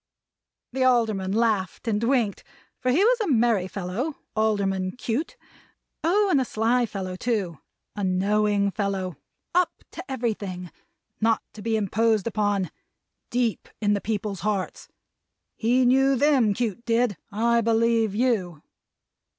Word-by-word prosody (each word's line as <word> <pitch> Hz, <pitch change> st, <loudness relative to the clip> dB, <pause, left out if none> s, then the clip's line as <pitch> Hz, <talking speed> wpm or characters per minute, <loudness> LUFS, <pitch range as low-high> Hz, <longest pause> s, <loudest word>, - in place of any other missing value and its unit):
The 260 Hz, 0 st, +1 dB
Alderman 220 Hz, -7 st, +2 dB
laughed, 215 Hz, -2 st, 0 dB
and 215 Hz, 0 st, 0 dB
winked; 235 Hz, -4 st, +1 dB, 0.4 s
for 255 Hz, -, -1 dB
he 305 Hz, +10 st, +4 dB
was -, -, +4 dB
a 425 Hz, -, 0 dB
merry 230 Hz, -, +2 dB
fellow. 200 Hz, -, -3 dB, 0.2 s
Alderman 195 Hz, -4 st, 0 dB
Cute. 255 Hz, -, -3 dB, 0.7 s
Oh, 400 Hz, +6 st, +3 dB
and 280 Hz, -, +4 dB
a -, -, +2 dB
sly 235 Hz, +1 st, +1 dB
fellow 190 Hz, -3 st, -5 dB
too! 190 Hz, -, -2 dB, 0.4 s
A 205 Hz, -, -3 dB
knowing 200 Hz, +2 st, +2 dB
fellow. 195 Hz, -5 st, -2 dB, 0.4 s
Up 360 Hz, 0 st, +1 dB
to -, -, -7 dB
everything. 205 Hz, -8 st, -3 dB, 0.5 s
Not 225 Hz, 0 st, +2 dB
to 215 Hz, -, -10 dB
be 225 Hz, +1 st, 0 dB
imposed 220 Hz, 0 st, +1 dB
upon. 205 Hz, -6 st, 0 dB, 0.6 s
Deep 240 Hz, -3 st, -1 dB
in 205 Hz, -1 st, +2 dB
the 200 Hz, -, 0 dB
people's 205 Hz, -2 st, -3 dB
hearts! 195 Hz, 0 st, -2 dB, 0.7 s
He 245 Hz, +3 st, +2 dB
knew 270 Hz, +2 st, +4 dB
them, 255 Hz, -6 st, +3 dB
Cute 235 Hz, -1 st, -2 dB
did. 235 Hz, -2 st, +1 dB, 0.2 s
I 235 Hz, +3 st, +2 dB
believe 225 Hz, -2 st, +2 dB
you! 205 Hz, -, 0 dB
220 Hz, 135 wpm, -25 LUFS, 200-245 Hz, 0.7 s, he